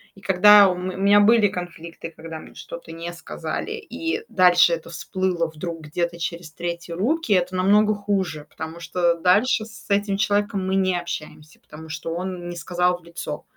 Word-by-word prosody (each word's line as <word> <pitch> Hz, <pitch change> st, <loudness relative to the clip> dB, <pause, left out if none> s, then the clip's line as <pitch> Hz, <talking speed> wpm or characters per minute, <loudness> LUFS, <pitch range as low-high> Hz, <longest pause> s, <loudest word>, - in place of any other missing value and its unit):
И 195 Hz, -, -16 dB
когда 200 Hz, +2 st, +7 dB
у 180 Hz, -, -1 dB
ме 185 Hz, +1 st, -4 dB
меня 200 Hz, +2 st, +5 dB
были 220 Hz, 0 st, +5 dB
конфликты, 170 Hz, -3 st, -7 dB
когда 160 Hz, 0 st, -8 dB
мне -, -, -14 dB
что-то 170 Hz, -1 st, -9 dB
не 165 Hz, +1 st, -6 dB
сказали, 175 Hz, -, -5 dB
и 420 Hz, -1 st, -4 dB
дальше 180 Hz, -2 st, +5 dB
это 165 Hz, 0 st, -5 dB
всплыло 180 Hz, -1 st, -1 dB
вдруг 160 Hz, +1 st, -6 dB
где-то 170 Hz, +3 st, -3 dB
через 170 Hz, -1 st, -5 dB
третьи 170 Hz, 0 st, -5 dB
руки, 230 Hz, -, 0 dB
это 180 Hz, 0 st, +1 dB
намного 210 Hz, +3 st, +4 dB
хуже, 190 Hz, -7 st, -2 dB
потому 160 Hz, +1 st, -7 dB
что 170 Hz, +1 st, +1 dB
дальше 205 Hz, +7 st, +3 dB
с 220 Hz, -1 st, -14 dB
этим 200 Hz, 0 st, +1 dB
человеком 205 Hz, -1 st, 0 dB
мы 190 Hz, -, 0 dB
не 185 Hz, -2 st, +2 dB
общаемся, 155 Hz, -2 st, -8 dB
потому 160 Hz, +1 st, -12 dB
что 155 Hz, +1 st, -4 dB
он 180 Hz, 0 st, -5 dB
не 175 Hz, -, -6 dB
сказал 180 Hz, +1 st, 0 dB
в -, -, -24 dB
лицо. 170 Hz, -3 st, -6 dB
180 Hz, 175 wpm, -23 LUFS, 170-200 Hz, -, когда